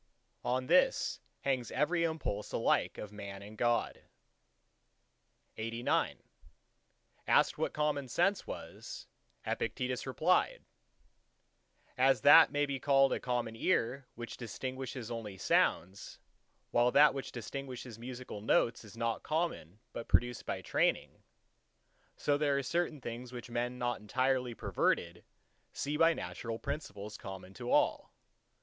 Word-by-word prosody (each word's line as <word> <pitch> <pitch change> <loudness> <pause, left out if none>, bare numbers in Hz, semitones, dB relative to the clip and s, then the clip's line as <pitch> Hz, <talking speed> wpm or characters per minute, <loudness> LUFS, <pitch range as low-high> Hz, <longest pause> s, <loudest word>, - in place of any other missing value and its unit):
On 130 +1 0
this - - +3 0.2
hangs 130 -4 0
every 170 +3 +1
impulse 160 -11 -2
alike - - +1
of 105 - -7
Man 100 -1 -8
and 105 +2 -11
God. 120 +1 0 1.6
XC 115 +2 -4 1.4
Asked - - +4
what - - -1
Common 150 -2 0
Sense 180 +10 +1
was, - - -8 0.4
Epictetus 125 0 -2
replied:— - - +1 1.3
As 130 0 +4
that 160 +3 +9
may 145 0 +2
be 140 -2 -3
called 135 0 +4
a - - -1
Common 120 -2 -2
Ear 130 -2 0
which 120 0 -7
distinguishes 130 0 -5
only 110 -4 -5
sounds, 95 +1 +1 0.5
while 120 +1 +4
that 145 +3 +6
which 135 -1 -5
distinguishes 125 -1 -7
musical 125 -3 -7
notes 115 +2 +2
is 110 +1 -13
not 115 -1 -1
common 155 - -2
but 115 - -6
produced 120 -1 +1
by - - -3
training; - - 0 1.0
so 145 0 +1
there 145 -2 +2
are 140 - -1
certain 165 +1 -1
things 120 +1 -6
which 120 -1 -8
men 120 +1 -2
not 120 -1 -1
entirely 125 +2 0
perverted 85 -4 0 0.5
see 145 +1 -2
by 165 +2 +6
the 165 - +1
natural 115 -1 -5
principles 105 -7 -5
common 95 -2 -8
to 120 +3 -6
all. - - +2
125 Hz, 130 wpm, -33 LUFS, 115-140 Hz, 1.6 s, that